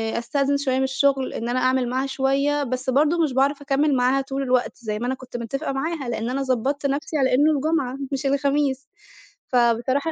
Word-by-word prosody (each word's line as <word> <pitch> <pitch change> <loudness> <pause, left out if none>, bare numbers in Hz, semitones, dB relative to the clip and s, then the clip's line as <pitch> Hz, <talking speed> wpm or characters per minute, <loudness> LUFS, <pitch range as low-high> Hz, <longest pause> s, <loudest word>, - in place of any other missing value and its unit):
آآ - - 0
أستأذن 275 +4 0
شوية 265 -2 0
من 265 - +1
الشغل، 270 0 +1
إن 235 - -4
أنا 250 +1 0
أعمل 255 -1 +1
معاها 260 +2 -1
شوية، 275 +2 +1
بس 255 0 -3
برضه 305 +5 +3
مش 295 -5 -1
باعرف 275 +2 +1
أكَمّل 285 +1 +1
معاها 255 +2 +2
طول 270 0 -4
الوقت، 255 -1 0
زي 215 -3 -4
ما 240 - -3
أنا 260 - -1
كنت 255 -2 -9
متفقة 240 +4 -3
معاها، 275 -1 -3
لأن 230 0 -2
أنا 270 +2 -1
ضبطت 270 +2 -1
نفسي 295 +3 -1
على 260 -2 +2
إنه 290 +5 +4
الجمعة، 285 -3 0
مش 275 0 -3
الخميس. 280 0 0 0.6
فبصراحة 250 +5 +1
270 Hz, 200 wpm, -23 LUFS, 255-280 Hz, 0.6 s, إنه